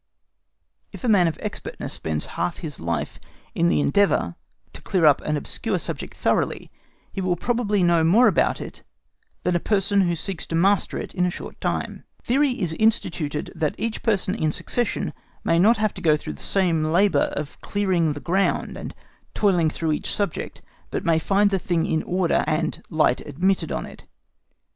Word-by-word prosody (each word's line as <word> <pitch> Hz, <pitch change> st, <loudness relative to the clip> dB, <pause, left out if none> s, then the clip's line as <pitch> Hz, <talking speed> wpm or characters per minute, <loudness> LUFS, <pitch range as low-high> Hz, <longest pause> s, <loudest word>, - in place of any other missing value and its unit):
If -, -, -11 dB
a -, -, 0 dB
man 195 Hz, -6 st, +5 dB
of 160 Hz, -, -2 dB
expertness -, -, -5 dB
spends 80 Hz, -1 st, -2 dB
half 90 Hz, -, -2 dB
his 150 Hz, -4 st, -6 dB
life 85 Hz, +1 st, -3 dB, 0.3 s
in 85 Hz, -, +2 dB
the 80 Hz, -3 st, +2 dB
endeavour 85 Hz, -, +2 dB, 0.4 s
to -, -, -9 dB
clear 180 Hz, -4 st, +1 dB
up 145 Hz, -2 st, +5 dB
an 150 Hz, 0 st, -1 dB
obscure -, -, -2 dB
subject -, -, -5 dB
thoroughly, -, -, 0 dB, 0.4 s
he 195 Hz, -, -3 dB
will 185 Hz, -1 st, +1 dB
probably 210 Hz, -1 st, 0 dB
know 170 Hz, -2 st, +4 dB
more 210 Hz, +10 st, +5 dB
about -, -, +2 dB
it -, -, -8 dB, 0.6 s
than 180 Hz, -, +1 dB
a -, -, +3 dB
person 200 Hz, +1 st, +2 dB
who 175 Hz, -2 st, +1 dB
seeks 170 Hz, +1 st, -4 dB
to 165 Hz, -, -3 dB
master 195 Hz, +4 st, +2 dB
it -, -, -6 dB
in 180 Hz, -, 0 dB
a -, -, +1 dB
short -, -, -8 dB
time. -, -, -2 dB, 0.2 s
Theory 275 Hz, +4 st, +2 dB
is 175 Hz, -5 st, -1 dB
instituted 160 Hz, -7 st, 0 dB
that 155 Hz, -2 st, -1 dB
each 225 Hz, 0 st, -3 dB
person 200 Hz, -4 st, +1 dB
in 155 Hz, -7 st, 0 dB
succession 240 Hz, +9 st, -2 dB, 0.3 s
may 165 Hz, -, +2 dB
not 220 Hz, +6 st, +5 dB
have 215 Hz, -1 st, 0 dB
to 185 Hz, -, -9 dB
go 155 Hz, -3 st, +4 dB
through 75 Hz, -, -6 dB
the 70 Hz, -, -12 dB
same 175 Hz, -5 st, +1 dB
labour 170 Hz, -1 st, +3 dB
of 145 Hz, 0 st, -6 dB
clearing 185 Hz, -6 st, +1 dB
the 145 Hz, -, -7 dB
ground 185 Hz, +8 st, 0 dB
and -, -, -7 dB, 0.4 s
toiling 180 Hz, -6 st, +3 dB
through 160 Hz, 0 st, -2 dB
his 150 Hz, -, -2 dB
subject, 205 Hz, -1 st, -2 dB, 0.3 s
but -, -, -3 dB
may 165 Hz, -2 st, +3 dB
find 200 Hz, +4 st, +2 dB
the 195 Hz, -, +1 dB
thing 175 Hz, -2 st, 0 dB
in 160 Hz, -, 0 dB
order, 180 Hz, -1 st, +1 dB
and 155 Hz, +1 st, -1 dB
light 155 Hz, -1 st, +2 dB
admitted 170 Hz, +2 st, 0 dB
on -, -, -2 dB
it. -, -, -13 dB
175 Hz, 185 wpm, -23 LUFS, 155-200 Hz, 0.6 s, man